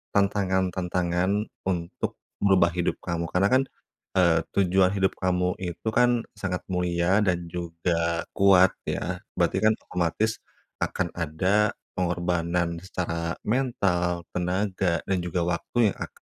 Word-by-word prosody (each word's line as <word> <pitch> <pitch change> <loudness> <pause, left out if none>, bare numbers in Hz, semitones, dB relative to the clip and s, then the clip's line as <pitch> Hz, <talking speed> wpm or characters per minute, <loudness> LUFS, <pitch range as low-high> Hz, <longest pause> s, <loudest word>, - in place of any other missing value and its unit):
tantangan-tantangan 95 -2 +1 0.4
untuk 85 -2 -2 0.2
merubah 95 -4 +4
hidup 90 0 -1
kamu? 85 -1 -2
Karena 90 +4 +2
kan, 130 +1 +5 0.5
eee, 85 -3 +4 0.2
tujuan 95 -1 +4
hidup 95 -1 +2
kamu 90 -1 0
itu 90 +3 -5
kan 120 0 +3 0.2
sangat 90 -3 -2
mulia 90 +1 +2
dan 90 -1 +1
juga 85 0 -1
kuat 95 -1 +6 0.2
ya. - - -2 0.2
Berarti - - +1
kan 110 0 +4
otomatis 90 +5 -1 0.4
akan 90 -3 -1
ada 95 +6 +1 0.2
pengorbanan 85 -1 0
secara 85 -2 -3
mental, 100 -8 0
tenaga, 90 -1 0
dan 95 - 0
juga 90 0 -2
waktu 95 +6 +1
yang - - -11
ak - - -6
90 Hz, 120 wpm, -26 LUFS, 85-95 Hz, 0.5 s, kuat